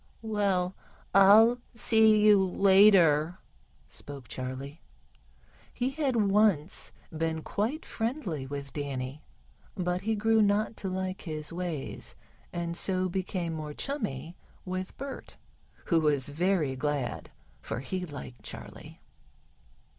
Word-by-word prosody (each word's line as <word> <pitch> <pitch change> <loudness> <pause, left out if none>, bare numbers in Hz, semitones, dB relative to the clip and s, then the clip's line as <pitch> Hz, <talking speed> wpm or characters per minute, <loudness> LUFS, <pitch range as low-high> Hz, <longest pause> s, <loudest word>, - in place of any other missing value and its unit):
"Well, 200 -4 0 0.4
I'll 215 +5 +7 0.2
see 220 -2 +5
you 205 -2 +7
later," 185 -4 +5 0.5
spoke 140 -4 -10
Charley. 130 +5 -6 0.9
He 255 +1 -1
had 275 -3 -1 0.2
once 195 -6 +2 0.2
been 160 0 -2
quite 240 +10 -2
friendly 225 - -3
with 140 -1 -6
Danny, 140 0 -4 0.5
but 180 -1 -1
he 220 +1 0
grew 220 +1 +3
not 210 +2 +2
to 195 - -3
like 185 0 -3
his 155 -1 -5
ways, 170 -5 -5 0.4
and 170 -1 -3
so 185 0 0
became 180 -2 -2
more 155 -2 -6
chummy 165 - -3 0.3
with 185 0 -5
Bert, 275 0 -8 0.5
who 165 - +3
was 145 -3 +1
very 160 -3 +1
glad, 145 -1 -2 0.3
for - - -4
he 180 +8 -4
liked 140 -7 -8
Charley. - - -9
180 Hz, 115 wpm, -29 LUFS, 150-210 Hz, 0.9 s, I'll